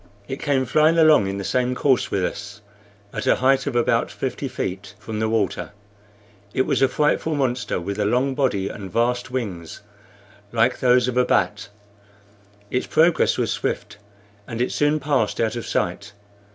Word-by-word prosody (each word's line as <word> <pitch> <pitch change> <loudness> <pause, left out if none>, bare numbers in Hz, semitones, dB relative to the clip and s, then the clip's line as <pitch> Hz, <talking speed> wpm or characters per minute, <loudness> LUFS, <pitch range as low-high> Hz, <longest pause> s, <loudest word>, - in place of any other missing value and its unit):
It 135 - -5
came 135 -3 +1
flying 155 +6 +3
along 155 -10 +5
in 100 0 -3
the 100 - -4
same 125 +3 0
course 130 -1 +2
with 95 -2 0
us, 100 +1 -6 0.5
at - - -4
a - - +5
height 135 +2 +2
of 135 - -2
about 120 - +2
fifty - - -4
feet 95 +2 -5
from 105 0 -6
the 110 0 0
water. 110 -2 -1 0.8
It 130 - +3
was - - 0
a 135 - +6
frightful 150 +3 0
monster, 125 -7 -1
with 100 +4 -5
a 105 - +1
long 125 +5 +1
body 125 -9 0
and 95 -2 -7
vast 120 +5 0
wings 100 -11 -5 0.7
like - - +2
those 125 -1 +4
a - - 0
bat. - - 0 1.0
Its 125 - -1
progress 160 +1 +3
was - - 0
swift, 105 - -3 0.5
and 115 - -5
it 125 - 0
soon 150 +1 +1
passed 145 -1 0
out 115 0 0
of 120 - -5
sight. - - -2
125 Hz, 170 wpm, -22 LUFS, 105-135 Hz, 1.0 s, a